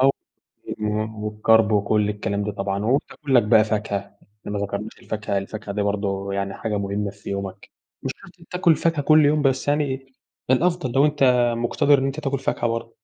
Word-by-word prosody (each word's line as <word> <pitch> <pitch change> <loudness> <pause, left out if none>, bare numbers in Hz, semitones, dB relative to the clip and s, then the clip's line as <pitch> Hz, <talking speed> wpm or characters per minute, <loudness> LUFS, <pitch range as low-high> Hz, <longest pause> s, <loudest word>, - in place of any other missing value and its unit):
و 135 - +6 1.1
والكارب 110 +1 +3
وكل 105 0 +2
الكلام 105 -1 -2
ده 105 - -3
طبعًا. 100 0 -2
وبتاكل 135 +3 -1
لك 120 - +7
بقى 110 0 +5
فاكهة، 105 -2 -1 0.4
إحنا 105 - -7
ما 105 - -2
ذكرناش 100 +2 -4
الفاكهة، 105 -2 -2
الفاكهة 100 +1 -6
دي 105 - 0
برضه 100 -1 -2
يعني 100 0 -2
حاجة 105 -3 -2
مهمة 100 +1 -2
في 100 0 -10
يومك. 100 -1 -5 0.3
مش 135 - -2
شرط 180 -3 -17
تاكل 180 -3 +3
فاكهة 165 -3 0
كل 155 +1 +5
يوم، 150 0 +2
بس 135 0 +1
يعني 135 -2 -1 0.4
الأفضل 160 -1 +2
لو 135 +2 +4
أنتَ 125 -5 +3
مقتدّر 130 +4 +3
إن 135 - 0
أنتَ 135 +3 -3
تاكل 140 -2 -1
فاكهة 120 - -1
برضه. 115 0 -3
110 Hz, 180 wpm, -23 LUFS, 100-135 Hz, 1.1 s, لك